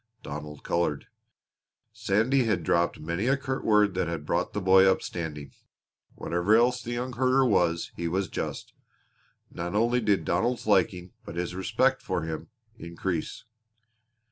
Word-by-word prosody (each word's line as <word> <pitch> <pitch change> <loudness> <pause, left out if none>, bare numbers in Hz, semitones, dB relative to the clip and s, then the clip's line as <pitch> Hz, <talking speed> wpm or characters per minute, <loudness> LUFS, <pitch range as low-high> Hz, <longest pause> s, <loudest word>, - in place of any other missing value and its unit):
Donald 75 0 -7
colored. 85 -4 -1 0.9
Sandy 115 +6 +1
had 100 -6 0
dropped 85 0 +1
many 85 +8 -2
a 135 +1 +3
curt 130 -1 -4
word 105 -2 +3
that 95 -2 -1
had 85 -3 -4
brought - - -1
the - - -1
boy 95 0 +6
up, - - -1
standing. 75 -4 -6 0.6
Whatever 90 +5 +1
else 125 +2 +3
the 120 0 -5
young 125 +1 -3
herder 130 +2 +3
was 85 -7 +1
he 85 - -3
was 95 +3 -1
just. - - -5 0.8
Not 85 +3 -5
only 120 +3 +2
did 100 -7 +1
Donald's 115 +10 0
liking, 95 -3 +1
but 85 - -9
his 90 0 -3
respect 95 0 +1
for - - -2
him, 80 -1 -5 0.3
increase. 85 0 -4
95 Hz, 150 wpm, -27 LUFS, 85-115 Hz, 0.9 s, boy